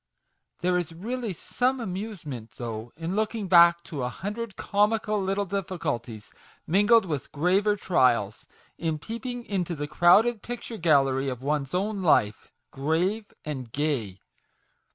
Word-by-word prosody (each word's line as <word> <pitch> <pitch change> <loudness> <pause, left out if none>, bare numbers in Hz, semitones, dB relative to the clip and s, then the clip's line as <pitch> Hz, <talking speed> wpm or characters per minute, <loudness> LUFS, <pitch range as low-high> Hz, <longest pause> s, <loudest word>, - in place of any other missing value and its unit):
There 180 0 +2
is 170 -2 -5
really 230 +5 -3
some 255 +8 -1
amusement, 180 - -6
though, 115 -1 -6
in 165 +3 -3
looking 215 -1 -1
back 170 -1 +6
to 160 -6 -6
a 125 - -1
hundred 210 - -5
comical 210 0 +1
little 195 +1 0
difficulties, 150 - -4 0.3
mingled 205 +5 +4
with 150 -6 -4
graver 190 +7 +2
trials; 125 - +1 0.3
in 160 -2 -1
peeping 235 - -6
into 180 -4 -2
the 145 -1 -3
crowded 205 +9 +4
picture 240 -1 -6
gallery 135 -5 +3
of 125 -1 -6
one's 145 0 -1
own 200 +2 -1
life 110 - +2 0.2
grave 175 +10 -1
and 130 -6 -5
gay 120 -10 -2
175 Hz, 130 wpm, -26 LUFS, 140-210 Hz, 0.3 s, back